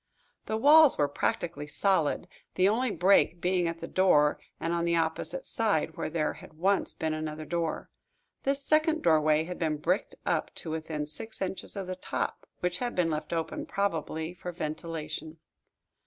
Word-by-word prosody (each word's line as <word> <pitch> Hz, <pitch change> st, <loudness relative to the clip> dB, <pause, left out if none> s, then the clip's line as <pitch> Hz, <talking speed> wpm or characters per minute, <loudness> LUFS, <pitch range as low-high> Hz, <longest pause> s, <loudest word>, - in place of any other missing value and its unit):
The 220 Hz, -, 0 dB
walls 300 Hz, +4 st, +7 dB
were 145 Hz, -, +3 dB
practically 145 Hz, +1 st, -2 dB
solid, 175 Hz, 0 st, +1 dB, 0.3 s
the 185 Hz, -, +4 dB
only 240 Hz, +5 st, +2 dB
break 180 Hz, -2 st, +3 dB
being 180 Hz, 0 st, +1 dB
at 165 Hz, 0 st, -4 dB
the -, -, -4 dB
door 150 Hz, -6 st, +4 dB, 0.2 s
and 165 Hz, +1 st, -1 dB
on 170 Hz, 0 st, 0 dB
the 170 Hz, 0 st, +2 dB
opposite 165 Hz, -, -1 dB
side, 160 Hz, -8 st, 0 dB
where -, -, -3 dB
there 155 Hz, -1 st, 0 dB
had -, -, -13 dB
once 190 Hz, +5 st, +1 dB
been 160 Hz, -2 st, -1 dB
another 155 Hz, 0 st, -4 dB
door. 165 Hz, 0 st, -2 dB, 0.5 s
This 275 Hz, +1 st, 0 dB
second 310 Hz, +2 st, +2 dB
doorway 155 Hz, -1 st, +4 dB
had 180 Hz, +2 st, -6 dB
been 155 Hz, -2 st, 0 dB
bricked 175 Hz, +6 st, -1 dB
up -, -, 0 dB
to 160 Hz, -, -6 dB
within 155 Hz, -1 st, -3 dB
six 155 Hz, +9 st, -3 dB
inches 190 Hz, +2 st, -2 dB
of 195 Hz, -2 st, -3 dB
the 185 Hz, 0 st, -4 dB
top, 185 Hz, -, -4 dB
which 180 Hz, 0 st, -1 dB
had 245 Hz, -1 st, -2 dB
been 170 Hz, -2 st, +2 dB
left 155 Hz, 0 st, -3 dB
open, 170 Hz, -, -3 dB
probably 165 Hz, -, -2 dB
for 180 Hz, 0 st, -6 dB
ventilation. 155 Hz, -1 st, -5 dB
170 Hz, 170 wpm, -29 LUFS, 155-195 Hz, 0.5 s, walls